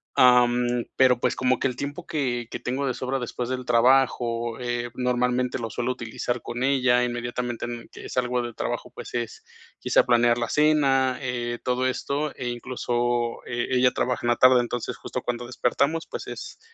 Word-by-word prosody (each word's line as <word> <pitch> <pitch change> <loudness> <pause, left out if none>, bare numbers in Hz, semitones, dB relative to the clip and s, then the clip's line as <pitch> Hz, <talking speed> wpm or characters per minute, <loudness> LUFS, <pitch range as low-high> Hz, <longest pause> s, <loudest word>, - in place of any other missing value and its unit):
am, 125 -1 +4
pero, 130 -2 +5
pues, - - +1
como 130 0 +2
que - - +2
el 125 - -4
tiempo 145 +6 -5
que 125 -6 -2
que - - -4
tengo 130 +3 -2
de 130 - 0
sobra 130 +2 -2
después 120 0 -4
del 130 0 -2
trabajo, 120 -1 +2
eh, 120 -1 -2
normalmente 125 0 0
lo 115 -2 -4
suelo 120 +3 -2
utilizar 120 0 -4
con 120 +1 -4
ella, 130 -2 +3
inmediatamente 120 0 -3
en 120 -1 -6
que - - -10
salgo 125 -1 0
de 120 -1 -5
trabajo, - - -4
pues, - - -9
es 120 -2 -4 0.3
quizá - - +3
planear 120 -1 +4
la 115 -1 -2
cena, 135 -4 +3
eh, 120 -2 -3
todo 125 0 +1
esto, 140 +3 -2
e 125 -2 -4
incluso 120 -1 -1
e 120 -1 -2
ella 125 0 +4
trabaja 125 -1 -1
en - - +2
la 120 - +4
tarde, 130 0 +6
entonces, 120 0 -3
justo - - -5
cuando 120 0 -3
despertamos, 140 +6 0
pues, - - -6
es - - -8
125 Hz, 185 wpm, -25 LUFS, 120-130 Hz, 0.3 s, tarde